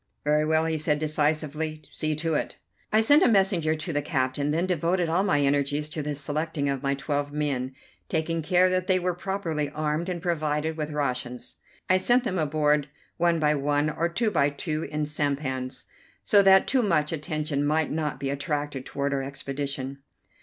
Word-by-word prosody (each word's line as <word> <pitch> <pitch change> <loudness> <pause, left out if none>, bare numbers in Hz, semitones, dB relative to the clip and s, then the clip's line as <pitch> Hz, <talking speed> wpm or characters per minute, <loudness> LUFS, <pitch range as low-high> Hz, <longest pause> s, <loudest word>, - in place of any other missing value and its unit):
"Very 150 +1 +2
well," 160 +1 +2
he 160 -1 -1
said, 150 0 +1
decisively, 155 0 -1
"see 155 0 -1
to 160 +1 -1
it." - - -2 0.3
I 215 +1 +5
sent 290 +8 +6
a - - +6
messenger 190 -7 +3
to 160 +2 -4
the 145 - +1
captain, 140 -1 -1
then 165 +4 +1
devoted 175 0 0
all 170 +3 +2
my 190 -8 +2
energies 145 +1 +1
to 155 - -4
the 150 0 -3
selecting 150 +1 -2
of 135 -2 -1
my 140 0 0
twelve 145 +1 -2
men, 140 -3 -2 0.4
taking 165 0 -1
care 180 +3 +4
that 185 0 0
they 185 - +4
were 180 0 0
properly 170 -5 -2
armed 155 +3 -2
and 175 -1 -3
provided 155 -2 -1
with 155 -1 -3
rations. 125 -4 -3 0.3
I 185 - +4
sent 245 +6 +3
them 190 -7 -1
aboard 150 -1 +1 0.3
one 170 -1 +3
by 150 -1 +3
one 145 +1 +1
or 165 +3 -1
two 215 +5 0
by 140 -7 +3
two 155 +2 -3
in 150 0 -1
sampans, 140 -3 -2 0.4
so 205 - +6
that 190 -1 +6
too 265 - +2
much 165 -9 +1
attention 155 -2 -2
might 155 +1 +1
not 150 -1 -2
be 135 0 -2
attracted 145 -1 -3
toward 140 0 -2
our 135 - 0
expedition. 135 0 -4
150 Hz, 185 wpm, -26 LUFS, 145-170 Hz, 0.4 s, sent